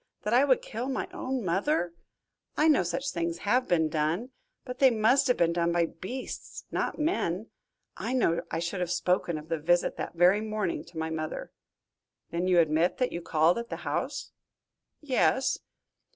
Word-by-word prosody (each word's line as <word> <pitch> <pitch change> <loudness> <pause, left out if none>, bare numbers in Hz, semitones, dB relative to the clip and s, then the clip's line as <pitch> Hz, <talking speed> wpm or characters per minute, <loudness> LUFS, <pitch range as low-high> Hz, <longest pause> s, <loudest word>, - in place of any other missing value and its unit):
That 210 - -1
I 255 +4 +6
would 260 -3 +3
kill 235 +4 -4
my 265 - -2
own 260 -4 -3
mother! 185 - 0 0.6
I 305 - +4
know 300 -8 +5
such 185 +11 -2
things 170 -1 -2
have 250 +5 +2
been 160 -3 +3
done, 160 +10 -1 0.3
but 250 -1 -7
they 270 - +7
must 245 +4 +3
have 250 - +3
been 170 0 +3
done 170 0 +1
by 170 0 +2
beasts, 210 +11 -7
not - - -1
men. 225 - -1 0.5
I - - -3
know 170 -10 +2
I - - -2
should 170 +3 -3
have 180 -1 -1
spoken 180 -1 0
of 150 +1 -9
the 165 -1 -2
visit 175 +3 +2
that - - -5
very 180 +5 +5
morning 215 -4 -2
to - - -13
my 160 0 -2
mother." 155 -1 -4 0.8
"Then 175 +2 -1
you 180 -1 +4
admit 160 +2 +2
that 250 - 0
you 170 - -4
called 165 +5 +2
at 235 - -6
the - - -6
house?" - - -3 0.7
"Yes." 265 -2 +2
180 Hz, 180 wpm, -28 LUFS, 170-250 Hz, 0.8 s, they